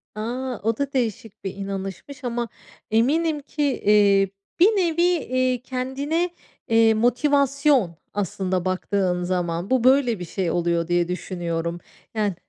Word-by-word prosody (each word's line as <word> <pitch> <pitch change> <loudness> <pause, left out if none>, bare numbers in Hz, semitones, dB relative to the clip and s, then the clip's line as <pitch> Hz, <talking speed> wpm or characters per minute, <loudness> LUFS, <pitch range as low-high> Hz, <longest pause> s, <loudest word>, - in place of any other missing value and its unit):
A! 245 +3 -3
O 225 +1 0
da 280 -1 -2
değişik 225 -5 -3
bir 190 -1 -4
inanışmış 195 +8 -6
ama 240 -1 -2 0.4
eminim 300 +8 +2
ki, 285 -1 -2
iii, 200 -2 +5 0.3
bir 355 - +8
nevi, 355 -6 +2
iii, 255 -8 +1
kendine, 270 +7 -2 0.4
eee, 225 -1 +5
motivasyon 275 - +2 0.2
aslında 190 -2 -2
baktığın 185 -1 0
zaman 175 0 -2
bu 260 -2 +2
böyle 255 -4 +4
bir 175 - -5
şey 175 0 -2
oluyor 170 -1 0
diye 175 -1 +2
düşünüyorum. 170 -1 -3 0.4
Yani 205 -4 0
225 Hz, 130 wpm, -23 LUFS, 185-265 Hz, 0.4 s, bir